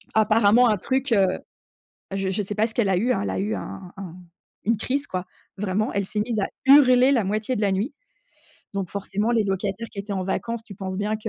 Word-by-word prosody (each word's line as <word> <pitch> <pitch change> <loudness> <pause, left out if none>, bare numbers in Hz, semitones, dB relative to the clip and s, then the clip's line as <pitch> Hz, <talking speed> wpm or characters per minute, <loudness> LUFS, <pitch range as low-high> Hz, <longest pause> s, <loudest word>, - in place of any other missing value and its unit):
Apparemment 220 +2 +5
un 210 - +2
truc, 265 +6 -1
heu 200 -4 +5 0.9
heu, - - -1
je 195 -1 -1
je 195 +2 -1
sais 205 +1 -5
pas 220 +1 +2
ce 225 - -12
qu'elle 230 -3 +1
a 190 - +3
eu 230 +8 +1
hein, 195 - +1
elle - - -2
a - - -2
eu 205 +3 -1
un 185 -2 -7
un 185 -4 -8 0.5
une 230 +1 +1
crise, 275 +6 -2
quoi. 185 0 -3 0.3
Vraiment, 205 +2 -1
elle 200 -1 0
s'est 210 +2 -3
mise 220 +1 -1
à 195 - 0 0.2
hurler 265 -2 +7
la 235 -5 +2
moitié 215 +5 -1
de 210 - -2
la 200 -2 +2
nuit. 200 +8 -1 0.8
Donc 195 -3 -3
forcément, 200 +3 -2
les 230 -3 +2
locataires 195 +3 -2
qui - - -12
étaient 200 +1 -6
en 190 -2 -2
vacances, 230 +4 -3
tu 215 -4 -11
penses 190 0 -5
bien 210 +1 0
210 Hz, 235 wpm, -24 LUFS, 195-230 Hz, 0.9 s, hurler